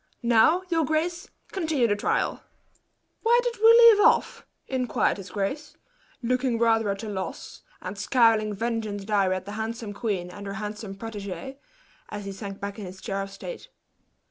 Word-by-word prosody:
Now, 240 +10 +4
your 330 -2 +2
grace, 340 +6 -1 0.2
continue 320 -9 +1
the 205 - +1
trial." 205 - -1 0.8
"Where 470 +1 +4
did 485 -1 -3
we - - +9
leave 465 -2 +8
off?" - - +3 0.2
inquired 255 -6 0
his 195 -1 -9
grace, 220 +11 -4 0.5
looking 250 0 +1
rather 225 -2 +3
at 200 +2 -3
a - - -5
loss, 190 -3 -6 0.2
and 185 +2 -5
scowling 225 0 +3
vengeance 220 -2 -3
dire 200 -3 +2
at 185 0 -2
the 205 - -7
handsome 225 -1 -4
queen 200 -5 -3
and 200 +2 -9
her 195 - -4
handsome 210 0 -6
protege, 225 +5 -7 0.5
as 205 -1 -6
he 200 - -4
sank 195 0 -7
back 200 +2 -5
in 205 - -6
his 185 +1 -10
chair 195 +1 -3
of 195 - -5
state. 475 - -9
220 Hz, 170 wpm, -26 LUFS, 200-270 Hz, 0.8 s, we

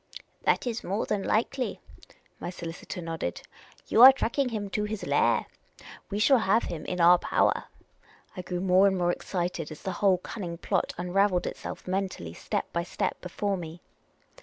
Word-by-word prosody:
" - - -41
That - - +3
is 235 -2 -3
more 200 +4 -1
than 210 -2 -1
likely," 240 +6 -1 0.6
my 175 - -5
solicitor 170 0 -7
nodded, 165 - -4 0.2
" - - -26
You 225 - +4
are 260 +2 +13
tracking 270 0 -1
him 210 -3 -3
to 210 +1 -1
his 215 0 -4
lair. - - +2 0.6
We 200 - -3
shall 250 +5 +5
have 220 +2 +2
him 165 -3 -5
in 180 - -3
our 175 +1 +7
power. - - +1 0.2
' - - -35
' - - -29
I 185 - -4
grew 180 0 -4
more 190 +1 +5
and 190 -1 +1
more 175 -1 +2
excited 175 -3 -3
as 155 - -10
the 190 - -2
whole 195 -3 +5
cunning 175 -2 -6
plot 190 +1 -1
unravelled 180 +1 +1
itself - - -6
mentally 185 - -3
step - - -3
by 170 - 0
step 170 - -3
before 195 +2 -2
me. 165 -1 -8
185 Hz, 185 wpm, -28 LUFS, 175-210 Hz, 0.6 s, are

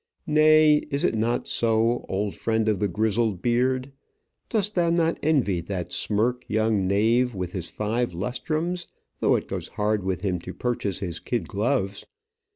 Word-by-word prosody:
Nay, 155 0 +5
is 140 0 -1
it - - +2
not 115 +2 0
so, 115 +1 +1
old 100 +1 -1
friend 110 -1 0
of 105 -4 +1
the 105 - +1
grizzled 110 0 0
beard? 130 +2 +1 0.6
Dost 210 -2 0
thou 175 -3 +2
not 170 -1 +1
envy 125 - +1
that 90 0 -4
smirk 115 +4 0
young 110 -3 +1
knave 115 +5 +2
with 90 -2 -4
his 90 -3 -5
five 110 -1 -2
lustrums, 155 - -2 0.3
though - - +3
it - - -2
goes - - -4
hard 105 -1 -1
with 95 -1 -2
him 95 -3 -1
to 90 +2 -8
purchase 115 -6 -2
his 90 -3 -3
kid 120 -3 -3
gloves? 100 -2 -1
110 Hz, 160 wpm, -25 LUFS, 100-130 Hz, 0.6 s, Nay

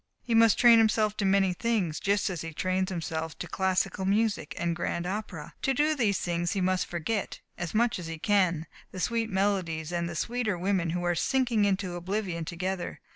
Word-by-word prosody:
He 235 - -2
must 225 -1 +5
train 235 -2 +7
himself 215 -1 +2
to 200 - 0
many 195 -1 +3
things, 195 -6 -1
just 200 0 +1
as 175 - -4
he 165 -1 -7
trains 185 +2 0
himself 160 -3 -4
to 175 - -5
classical 190 +1 0
music 205 -4 0
and 170 0 -1
grand 170 0 -2
opera. 190 -4 -5
To 270 - +1
do 300 +3 +3
these 225 -9 +1
things 175 -1 -1
he 195 - -1
must 185 0 +1
forget, 175 +5 -3 0.2
as 175 +2 -5
much 235 -2 +2
as 170 - -6
he 165 0 -5
can, 180 -3 +2 0.2
the 185 - -8
sweet 230 +3 0
melodies 190 -5 -1
and 170 -1 -1
the 170 - -6
sweeter 230 0 -1
women 180 -1 0
who 175 +2 -2
are 175 0 +2
sinking 235 +2 +1
into 190 -2 0
oblivion 180 -2 -3
together. 180 +2 -4
190 Hz, 195 wpm, -28 LUFS, 170-215 Hz, 0.2 s, train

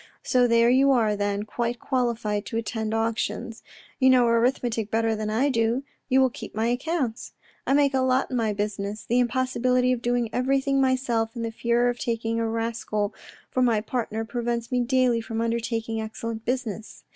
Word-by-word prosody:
So 250 -1 +3
there 235 0 +4
you 270 +2 +4
are 220 -4 +2
then, 205 0 -1
quite 235 +2 -3
qualified 230 -5 -1
to 225 - -3
attend 220 -1 -3
auctions. 225 +1 -2 0.4
You 260 -1 +5
know 255 -2 +5
arithmetic 230 -2 +1
better 225 0 +1
than 215 0 -3
I 245 +7 +2
do; 230 +1 +1 0.3
you 260 0 +4
will 260 -1 +3
keep - - -9
my 220 +1 0
accounts; 255 -2 -2 0.3
I - - +3
make 280 -1 +3
a 265 - +2
lot 260 +1 +1
in - - -1
my 225 -3 +1
business. 205 0 -3
The 240 +2 +2
impossibility 250 0 +1
of 250 -2 -1
doing 240 -2 0
everything 270 +2 +1
myself, 250 -4 0
and 230 -1 -3
the 225 - -3
fear 235 +2 +1
of 245 0 -1
taking 230 -1 -1
a 230 - 0
rascal 225 -2 -2 0.4
for 255 - 0
my 235 -4 +3
partner 225 -1 -3
prevents 235 0 -3
me 250 - +1
daily 245 -1 +2
from 225 0 -4
undertaking 230 -1 -2
excellent 220 +1 -5
business. 230 -4 -4
235 Hz, 180 wpm, -25 LUFS, 225-250 Hz, 0.4 s, You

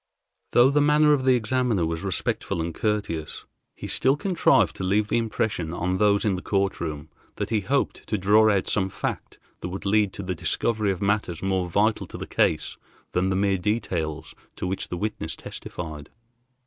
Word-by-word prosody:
Though 125 +3 +6
the 145 +1 +3
manner 150 +1 +5
of 135 -3 0
the 130 -1 +5
examiner 120 -5 +1
was 80 0 -3
respectful 95 -2 -2
and 80 +1 -2
courteous, 100 -8 -2 0.3
he - - -8
still 135 +2 +2
contrived 155 - +3
to - - -4
leave 105 +3 +1
the - - +2
impression 105 -7 -2
on 90 +1 -1
those 105 0 +3
in 100 -3 +2
the 90 - -5
court 100 -2 0
room 75 -3 -5 0.3
that - - -4
he 110 - +2
hoped 135 +8 -1
to 105 - 0
draw 105 +3 +5
out 100 -3 +2
some 95 -2 +1
fact - - -5 0.2
that 90 - -5
would 95 +2 -6
lead 105 0 +3
to 100 - -6
the 90 0 -2
discovery 100 +5 0
of 95 0 -4
matters 100 -5 0
more 95 -2 0
vital 105 +5 +1
to - - -8
the - - -5
case - - 0 0.3
than 90 +1 +1
the 95 - 0
mere 95 0 +1
details 85 -7 -2 0.2
to - - -4
which 95 +1 -3
the 90 - -4
witness 105 -5 -3
testified. 75 -4 -8
100 Hz, 190 wpm, -25 LUFS, 90-110 Hz, 0.3 s, Though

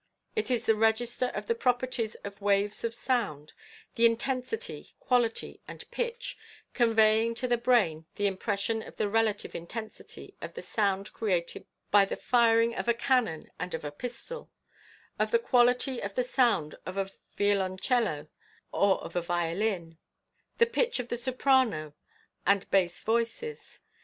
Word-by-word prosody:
It 435 - 0
is 245 -2 0
the 225 - +5
register 225 +3 +1
of 210 - -3
the 230 - +1
properties 245 -2 0
of 200 0 -8
waves 200 0 +1
of 230 0 -2
sound 210 - -1 0.2
— - - -22
the 235 0 +7
intensity, 265 - -2
quality 240 -3 0
and - - -8
pitch 485 +1 -3 0.2
— - - -27
conveying 225 -1 +4
to 250 +2 -2
the 245 - +3
brain 195 -11 +2
an 205 - 0
impression 200 +3 0
of - - -11
the 210 - +1
relative 220 0 +1
intensity 215 +6 -8
of - - -7
the - - -7
sound 200 -2 -1
created 180 -6 -2 0.2
by 200 -1 +7
the - - -4
firing 230 -1 +3
of - - -4
a 235 - +3
cannon 235 - 0
and 180 0 -3
of 160 - -6
a 145 - -3
pistol; 245 - -6 0.7
of - - +2
the 470 - +4
quality 250 - +3
of 200 0 -5
the 250 - +2
sound 240 - +1
of 185 +3 -6
a 195 0 -1 0.3
violoncello 195 - +1 0.4
or 200 -1 +3
of - - -9
a 175 - +1
violin 170 0 -1 0.3
— - - -45
the 465 - +6
pitch 470 - 0
of 245 -1 -4
the - - -1
soprano 245 - +1 0.5
and 200 -1 +3
bass 180 -3 +2
voices. 235 - -2
225 Hz, 160 wpm, -29 LUFS, 195-245 Hz, 0.7 s, the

